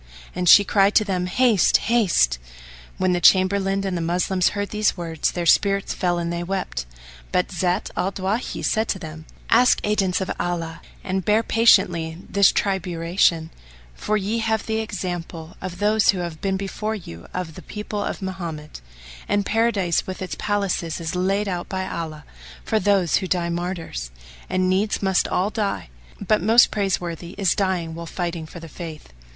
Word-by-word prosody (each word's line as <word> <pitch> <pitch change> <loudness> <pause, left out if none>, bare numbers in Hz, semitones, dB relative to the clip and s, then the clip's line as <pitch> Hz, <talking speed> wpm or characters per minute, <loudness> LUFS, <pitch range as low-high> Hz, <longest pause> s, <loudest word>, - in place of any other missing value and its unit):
And 180 -1 +1
she 205 - +9
cried 200 0 +3
to - - +6
them, 180 -3 -1
"Haste! 225 0 +4
Haste!" 190 - +2 0.6
When 185 -1 +1
the 175 - 0
Chamberlain 195 +2 +4
and 190 -2 -2
the 170 - -2
Moslems 180 +2 +1
heard 205 0 -2
these 210 -2 +1
words, 165 -3 -1
their 175 -1 -2
spirits 195 +3 +3
fell 175 -3 0
and 170 0 -2
they 170 - -3
wept; 185 - -3 0.4
but 180 - 0
Zat 180 0 -1
al 190 - 0
Dawahi 200 +5 -3
said 220 0 +1
to - - -1
them, 160 -3 -9 0.3
"Ask 250 +2 +5
aidance 195 -3 +1
of 190 - -3
Allah 165 -2 -3 0.2
and 190 -1 -2
bear 215 +4 +3
patiently 170 -9 +3
this 200 -1 +4
triburation; 170 -3 0 0.4
for 215 - -1
ye 210 +3 -1
have 220 -1 0
the 220 0 -1
example 175 -5 -5
of 180 -1 -6
those 210 +1 +2
who 195 - +4
have 170 -3 -5
been 195 -1 0
before 210 +3 -3
you 85 - -10
of 180 -3 -4
the - - -10
people 210 -1 -5
of - - -4
Mohammed; 170 - -6 0.5
and 205 -1 +1
Paradise 210 -6 +1
with 185 - -5
its 185 - -5
palaces 200 -5 -1
is 165 -1 -4
laid 195 +3 0
out 175 -2 -3
by 190 -1 -2
Allah 155 -4 -6 0.4
for 220 - +1
those 200 -5 +2
who 190 - -3
die 175 -2 0
martyrs; 170 - -4 0.4
and 185 0 +1
needs 200 +3 0
must 190 -1 +2
all 195 +4 0
die, 205 - -2 0.3
but 210 +2 +1
most 230 +3 +6
praiseworthy 175 -4 -2
is 195 -4 +2
dying 185 -4 -1
while 170 +1 -7
fighting 170 -3 -4
for 170 - -10
the 165 - -10
Faith." 155 - -9
185 Hz, 175 wpm, -23 LUFS, 170-205 Hz, 0.6 s, she